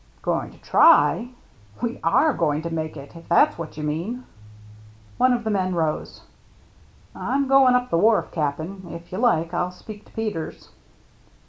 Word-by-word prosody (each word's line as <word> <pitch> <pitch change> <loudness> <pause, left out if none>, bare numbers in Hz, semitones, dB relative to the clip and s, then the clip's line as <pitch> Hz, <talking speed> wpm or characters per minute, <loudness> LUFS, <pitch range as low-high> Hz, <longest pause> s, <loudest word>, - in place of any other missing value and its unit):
" - - -32
Going - - -1
to - - -17
try? 240 - +4 0.5
We 235 0 -3
are 290 - +3
going 155 -4 0
to 170 - -4
make 155 -1 -4
it, 140 +4 -11
if 165 - -13
that's 170 - +4
what 165 -2 -7
you 155 - -5
mean." 175 +12 -3 1.0
One 255 - +4
of 240 -1 0
the 220 - -1
men 185 -2 0
rose. 160 -2 -2 0.5
" - - -30
I'm 275 0 -1
going 265 -2 +5
up 250 0 0
the 165 - +2
wharf, 220 +2 +3
Cap'n. 160 +5 -3
If 170 0 -10
you 185 - -4
like, 170 -9 +1
I'll 175 +1 0
speak 205 +3 -12
to - - -22
Peters." 215 -8 -5
180 Hz, 180 wpm, -23 LUFS, 165-230 Hz, 1.0 s, going